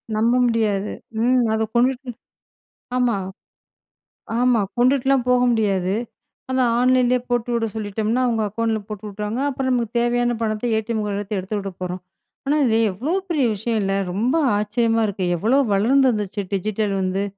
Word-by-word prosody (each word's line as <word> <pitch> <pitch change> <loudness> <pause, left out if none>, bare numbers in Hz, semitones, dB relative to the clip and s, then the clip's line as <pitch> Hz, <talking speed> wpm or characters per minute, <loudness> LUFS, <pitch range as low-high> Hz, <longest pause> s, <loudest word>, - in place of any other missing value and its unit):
நம்ப 230 +3 +2
முடியாது. 215 -4 0 0.3
ம். 250 0 +3
அதை 220 - +1
கொண்டுட்டு 255 +2 +1 0.9
ஆமா. 245 -5 +2 1.2
ஆமா, 250 -2 +3 0.2
கொண்டுட்டுலாம் 265 +1 +3
போக 250 0 +4
முடியாது. 195 -4 +1 0.6
அதான், 255 -2 +2
ஆன்லைன்லயே 250 0 +3
போட்டு 245 0 0
விட 230 -1 0
சொல்லிட்டோம்னா, 220 +3 -1
அவங்க 225 -2 0
அக்கவுண்ட்ல 220 +1 -1
போட்டு 215 -1 -7
விட்டுருவாங்க. 210 +4 -4
அப்புறம் 265 -1 -2
நமக்கு 240 -2 -1
தேவையான 240 0 +1
பணத்த 215 0 -2
ஏ.டி.எம். 220 0 -2
கார்டு 200 0 -2
வச்சு 205 +1 -4
எடுத்துவுடப்போறோம். 185 -2 -4 0.5
ஆனா, 290 +2 +2
இது 225 -2 +2
எவ்ளோ 260 - -3 0.2
பெரிய 305 -6 +1
விஷயம் 220 +2 -2
இல்ல? 195 0 0 0.2
ரொம்ப 235 - 0 0.2
ஆச்சரியமா 225 +2 +1
இருக்கு. 190 -2 -2
எவ்ளோ 225 +10 +2
வளர்ந்து 260 +7 +4
வந்துருச்சு, 210 -2 -2
டிஜிட்டல் 210 +1 -1
வந்து. 190 +1 -1
225 Hz, 140 wpm, -21 LUFS, 205-245 Hz, 1.2 s, போக